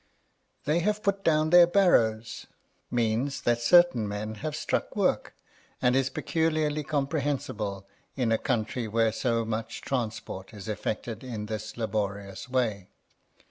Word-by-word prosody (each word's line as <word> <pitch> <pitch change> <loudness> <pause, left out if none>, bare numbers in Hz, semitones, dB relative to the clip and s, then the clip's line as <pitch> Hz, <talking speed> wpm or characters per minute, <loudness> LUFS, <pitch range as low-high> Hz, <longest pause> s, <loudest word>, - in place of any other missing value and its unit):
They 155 +3 +2
have 210 +4 0
put 200 0 0
down 155 -1 +2
their 175 -1 +8
barrows, 115 - +2 0.4
means 120 +4 0
that 120 0 +2
certain 175 -4 +5
men 105 +1 -4
have 155 0 -3
struck - - -2
work, - - 0 0.4
and 125 0 +3
is 135 -1 +2
peculiarly 155 -2 0
comprehensible 135 - -2 0.3
in 125 -4 0
a 115 - +2
country 115 -1 -1
where 115 +1 +2
so 115 -1 0
much 115 +1 -4
transport 110 -5 -4
is 100 -1 -9
effected 110 +2 -4
in 115 -5 -5
this 110 0 -6
laborious 100 -2 -3
way. 110 -7 -1
120 Hz, 135 wpm, -28 LUFS, 110-150 Hz, 0.4 s, their